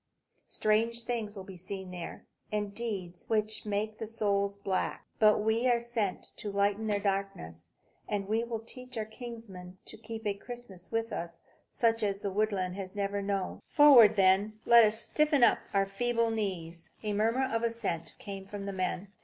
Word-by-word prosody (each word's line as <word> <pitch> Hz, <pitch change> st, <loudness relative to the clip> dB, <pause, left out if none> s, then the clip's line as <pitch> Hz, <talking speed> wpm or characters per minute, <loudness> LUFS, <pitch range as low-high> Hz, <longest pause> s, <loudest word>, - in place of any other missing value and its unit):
Strange 230 Hz, +2 st, +1 dB
things 225 Hz, -3 st, -3 dB
will 190 Hz, -, -6 dB
be 190 Hz, 0 st, -10 dB
seen 185 Hz, +1 st, -6 dB
there, 175 Hz, -2 st, -7 dB, 0.3 s
and 205 Hz, -1 st, -2 dB
deeds 195 Hz, -6 st, -4 dB
which 215 Hz, -1 st, 0 dB
make 210 Hz, +1 st, -2 dB
the 220 Hz, -, -4 dB
soul 200 Hz, -3 st, +1 dB
black. 190 Hz, -1 st, -1 dB
But 215 Hz, -1 st, +5 dB
we 225 Hz, +3 st, +2 dB
are 240 Hz, -1 st, +4 dB
sent 235 Hz, -5 st, -2 dB
to 210 Hz, -, -5 dB
lighten 200 Hz, +2 st, +1 dB
their 205 Hz, -1 st, +1 dB
darkness; 195 Hz, -, -3 dB, 0.4 s
and 200 Hz, -2 st, -1 dB
we 220 Hz, +2 st, +1 dB
will 230 Hz, -2 st, -4 dB
teach 250 Hz, +2 st, -10 dB
our 220 Hz, -, -1 dB
kinsmen 220 Hz, -6 st, -9 dB
to -, -, -10 dB
keep 225 Hz, 0 st, -8 dB
a 205 Hz, -, +1 dB
Christmas 200 Hz, -4 st, -10 dB
with 225 Hz, 0 st, -1 dB
us 170 Hz, 0 st, -5 dB, 0.3 s
such 230 Hz, -1 st, +2 dB
as 200 Hz, -1 st, -1 dB
the 200 Hz, -, -2 dB
woodland 195 Hz, -3 st, 0 dB
has 190 Hz, 0 st, -6 dB
never 200 Hz, 0 st, -1 dB
known. 195 Hz, -2 st, -2 dB
Forward, 250 Hz, -8 st, +8 dB
then, 190 Hz, -1 st, +6 dB
and 215 Hz, +1 st, -9 dB
let 235 Hz, -1 st, +8 dB
us 215 Hz, +1 st, +3 dB
stiffen 300 Hz, +1 st, +2 dB
up -, -, +6 dB
our 195 Hz, -1 st, +3 dB
feeble 230 Hz, +3 st, 0 dB
knees!" 175 Hz, -6 st, -4 dB
A 210 Hz, -1 st, -1 dB
murmur 225 Hz, +6 st, +2 dB
of 225 Hz, -, +1 dB
assent 230 Hz, -8 st, -2 dB
came 195 Hz, -1 st, -7 dB
from 200 Hz, 0 st, -6 dB
the 200 Hz, -, -4 dB
men. 185 Hz, +1 st, -2 dB
210 Hz, 180 wpm, -31 LUFS, 195-225 Hz, 0.4 s, Forward